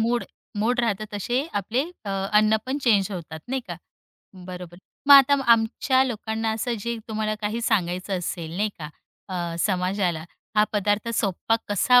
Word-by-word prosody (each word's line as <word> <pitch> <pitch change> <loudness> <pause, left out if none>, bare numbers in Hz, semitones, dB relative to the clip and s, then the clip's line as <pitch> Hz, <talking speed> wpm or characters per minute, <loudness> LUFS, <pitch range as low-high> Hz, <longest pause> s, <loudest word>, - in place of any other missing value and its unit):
Mood 235 +2 +1 0.3
mood 240 +4 +1
राहत 220 -3 0
तसे 245 - -1
आपले 230 +7 0 0.2
अ, 200 - -4 0.2
अन्न 215 +1 +5
पण 265 +2 -1
चेंज 205 -4 +3
होतात 160 -3 -7
नाही 265 0 -1
का. 175 - -5 0.7
बरोबर, 180 -1 -8 0.3
मग 285 - +8
आता 275 0 +8 0.2
आमच्या 235 +4 +2
लोकांना 220 -2 -2
असं 235 +2 -1
जे 235 +2 -2
तुम्हाला 215 0 -1
काही 215 +3 -1
सांगायचं 185 -1 0
असेल 170 -1 -5
नाही 210 +3 +1
का? 150 -2 -6 0.4
अ, 175 -3 -3
समाजाला, 180 -3 0 0.3
हा 210 - +6
पदार्थ 205 +2 +1
सोप्पा 205 +2 +1
कसा 245 +5 +5
210 Hz, 155 wpm, -24 LUFS, 185-235 Hz, 0.7 s, मग